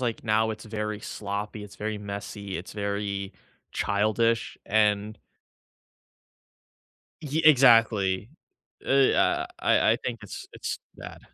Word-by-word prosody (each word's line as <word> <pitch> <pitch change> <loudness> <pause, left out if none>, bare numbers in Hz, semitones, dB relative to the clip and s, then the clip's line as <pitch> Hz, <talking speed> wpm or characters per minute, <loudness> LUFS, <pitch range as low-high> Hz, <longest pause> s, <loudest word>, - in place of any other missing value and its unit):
like, 120 -3 -2
now 110 0 +2
it's 110 0 -7
very 105 -1 -4
sloppy, 105 +1 -5
it's 100 - -13
very 105 0 -3
messy, 100 -1 -6
it's 85 - -8
very 100 -1 -3 0.4
childish, 110 +3 +1
and 105 0 +1 2.0
ye 155 +1 -1
exactly. 115 -8 +5 0.5
Eh, 135 0 +4
uh, - - +2
I - - +4
I - - +1
think 120 -2 -3
it's 105 - -8
it's - - -4 0.2
bad. - - -10
105 Hz, 115 wpm, -27 LUFS, 100-115 Hz, 2.0 s, exactly